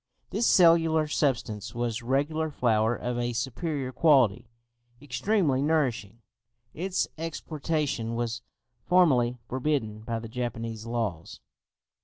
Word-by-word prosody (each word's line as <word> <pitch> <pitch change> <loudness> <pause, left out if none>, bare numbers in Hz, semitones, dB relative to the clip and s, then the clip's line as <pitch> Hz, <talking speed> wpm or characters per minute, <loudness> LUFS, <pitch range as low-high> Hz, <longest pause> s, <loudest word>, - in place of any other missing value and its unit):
This 220 +4 +1
cellular 165 -3 +5
substance 120 -9 -1
was 120 -1 -2
regular 145 +6 0
flour 115 -4 +1
of 120 0 -3
a 120 0 -1
superior 130 +3 -3
quality, 125 - +3 0.5
extremely 145 -2 0
nourishing; 125 -8 -1 0.5
its 185 +3 -1
exportation 155 -7 -2
was 115 -1 -2 0.4
formerly 130 -10 +3
forbidden 130 -5 -1
by 115 +1 -4
the 115 0 -6
Japanese 115 -2 -5
laws. 110 -9 -3
125 Hz, 105 wpm, -27 LUFS, 115-155 Hz, 0.5 s, cellular